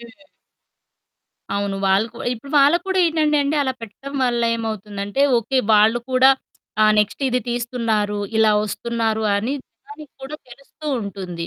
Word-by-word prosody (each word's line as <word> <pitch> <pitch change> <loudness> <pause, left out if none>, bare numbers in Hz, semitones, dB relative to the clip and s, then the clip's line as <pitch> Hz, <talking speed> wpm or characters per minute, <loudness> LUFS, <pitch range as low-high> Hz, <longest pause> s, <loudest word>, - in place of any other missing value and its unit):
హ్మ్. 235 +5 -15 1.3
అవును 200 -1 -2
వాళ్ళు 195 +3 +3
కూ 235 - -12
ఇప్పుడు 250 +4 -9
వాళ్ళకి 295 +5 +4
కూడా 380 0 0
ఏంటంటే, 310 -2 +1
అంటే 290 +2 0
అలా 260 -2 -1
పెట్టడం 250 +6 -9
వల్ల 240 -1 0
ఏమవుతుందంటే, 210 +1 -3 0.2
ఓకే 260 +4 -1 0.2
వాళ్ళు 215 +3 +4
కూడా 255 +1 +6 0.5
ఆహ్, 215 0 +5
నెక్స్ట్ 210 +6 0
ఇది 250 0 0
తీస్తున్నారు, 230 -4 -1 0.2
ఇలా 220 -1 +4
వస్తున్నారు, 225 +1 -2
అని 220 +6 -2
జనానికి 400 -9 -15
కూడా 280 +3 -6
తెలుస్తూ 275 +5 -13
ఉంటుంది. 185 -4 -6
235 Hz, 140 wpm, -21 LUFS, 210-275 Hz, 1.3 s, కూడా